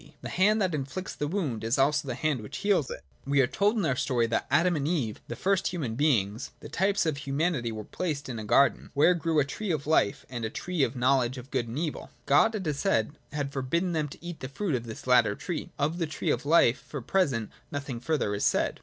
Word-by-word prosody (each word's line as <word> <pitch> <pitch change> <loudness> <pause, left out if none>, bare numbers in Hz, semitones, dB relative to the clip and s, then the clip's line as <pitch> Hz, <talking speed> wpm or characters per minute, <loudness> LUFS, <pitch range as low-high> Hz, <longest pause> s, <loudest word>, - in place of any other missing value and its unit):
The - - -4
hand 210 +4 +3
that 185 -3 0
inflicts 145 +6 -4
the 145 - -3
wound 150 - -2
is 115 +3 +1
also 145 +1 +2
the 125 - -2
hand 150 -4 0
which 105 - -7
heals 195 -9 +1
it. - - -7 0.2
We 140 +1 +1
are 135 - +6
told 200 - +1
in 200 - +1
our 135 - +1
story 125 -2 +1
that 115 - -1
Adam 175 0 +3
and 145 -1 -1
Eve, 140 -11 -1
the - - -5
first 195 0 +1
human 155 -11 -3
beings, 115 -6 +1
the - - -10
types 195 +1 +1
of 155 -3 0
humanity, 140 -3 -1
were 110 -1 -5
placed 150 - -3
in 120 -4 -4
a - - -5
garden, 140 +6 +3
where 150 +6 +5
grew 165 -2 -1
a 140 - +3
tree 205 +8 -5
of 155 -4 -1
life 150 -9 +2
and 120 -2 -5
a 110 - -1
tree 180 +6 -3
of 125 -3 +2
the 125 - -7
know 135 +2 +5
ledge 125 +1 -2
of 125 +2 -10
good 125 -3 0
and 115 +4 -5
evil. 155 -1 -3 0.2
God, 220 +10 +4
it 195 -3 -3
is 150 -2 -1
said, 110 +4 +1 0.2
had 140 -1 -3
forbidden 170 +7 0
them 155 -3 0
to 145 - -12
eat 175 -2 -5
of - - -31
the 130 - -6
fruit 180 +4 -2
of 120 -2 -2
this 110 - -8
latter 120 -5 +4
tree: 175 - -4
of 155 +5 0
the 165 - 0
tree 155 - -1
of 130 +4 -2
life 145 -5 +5
for 145 - -6
the 120 - -12
present 135 - +1 0.2
nothing 140 -4 -4
further 135 -5 0
is 100 - -2
said. - - +1
145 Hz, 260 wpm, -28 LUFS, 125-170 Hz, 0.2 s, are